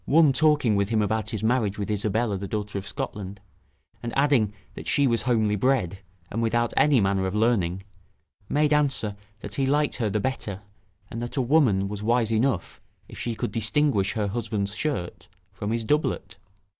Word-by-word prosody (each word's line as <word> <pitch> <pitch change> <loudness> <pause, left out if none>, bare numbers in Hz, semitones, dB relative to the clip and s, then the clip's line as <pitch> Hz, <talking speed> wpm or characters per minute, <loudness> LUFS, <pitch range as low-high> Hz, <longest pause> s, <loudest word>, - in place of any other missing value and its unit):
one 155 -1 +5
talking 150 -6 +3
with 100 0 +1
him 110 -1 +1
about 110 +1 0
his 110 -3 -4
marriage 110 -3 +1
with 105 0 -3
Isabella 105 +1 0
the 100 +1 -4
daughter 105 -1 -3
of 100 - -9
Scotland, 100 -1 -5 0.6
and 120 - -4
adding 135 -7 +3 0.2
that - - -9
she 140 - +3
was 115 -3 +2
homely 110 -4 +1
bred, 105 -5 +1 0.3
and 115 - -2
without 120 +1 +1
any 145 -4 +4
manner 95 -1 +1
of 95 - -4
learning, 95 -5 +1 0.7
made 150 0 +2
answer, 135 -8 +1 0.3
that - - -7
he 135 -1 0
liked 145 +1 +1
her 115 -4 0
the 105 +2 0
better, 105 -5 -3 0.5
and 115 - -5
that 120 +4 -5
a - - +3
woman 120 -8 +3
was 105 0 -5
wise 115 +1 +1
enough, 110 -4 0 0.3
if - - -11
she 120 -1 -3
could 105 - -3
distinguish 110 -1 +1
her 110 -2 -1
husband's 105 -2 -2
shirt 90 - -3 0.3
from 100 +2 -4
his 115 +1 -1
doublet. 150 +7 -1
110 Hz, 180 wpm, -25 LUFS, 100-130 Hz, 0.7 s, one